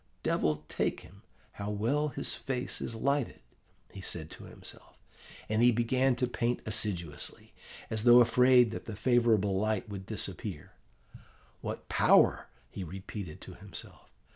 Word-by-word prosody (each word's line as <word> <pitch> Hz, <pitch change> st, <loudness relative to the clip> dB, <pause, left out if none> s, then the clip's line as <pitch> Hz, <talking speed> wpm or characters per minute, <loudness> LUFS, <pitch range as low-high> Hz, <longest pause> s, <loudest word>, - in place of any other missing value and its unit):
'Devil 75 Hz, 0 st, 0 dB
take -, -, -1 dB
him, 100 Hz, +4 st, -16 dB, 0.3 s
how 100 Hz, 0 st, -6 dB
well 120 Hz, +9 st, 0 dB
his 145 Hz, -, -3 dB
face 130 Hz, -2 st, -3 dB
is 115 Hz, -, -3 dB
lighted!' 140 Hz, +2 st, -1 dB, 0.5 s
he 95 Hz, -, -9 dB
said 80 Hz, -4 st, 0 dB
to -, -, -11 dB
himself, -, -, -12 dB, 0.5 s
and 110 Hz, +1 st, +1 dB
began 130 Hz, +2 st, +2 dB
to 125 Hz, -, 0 dB
paint 120 Hz, 0 st, -1 dB
assiduously, 90 Hz, -8 st, -3 dB, 0.4 s
as 110 Hz, -1 st, -1 dB
though 120 Hz, +1 st, +8 dB
afraid 125 Hz, 0 st, +5 dB
that 115 Hz, -, -6 dB
the 110 Hz, -4 st, -6 dB
favourable 110 Hz, -3 st, +3 dB
light 110 Hz, 0 st, -1 dB
would 95 Hz, -2 st, -7 dB
disappear. 95 Hz, -5 st, -3 dB, 0.9 s
'What -, -, -5 dB
power!' -, -, +4 dB, 0.2 s
he 95 Hz, -, -5 dB
repeated 95 Hz, 0 st, -7 dB
to -, -, -10 dB
himself. -, -, -11 dB
110 Hz, 140 wpm, -31 LUFS, 95-125 Hz, 0.9 s, though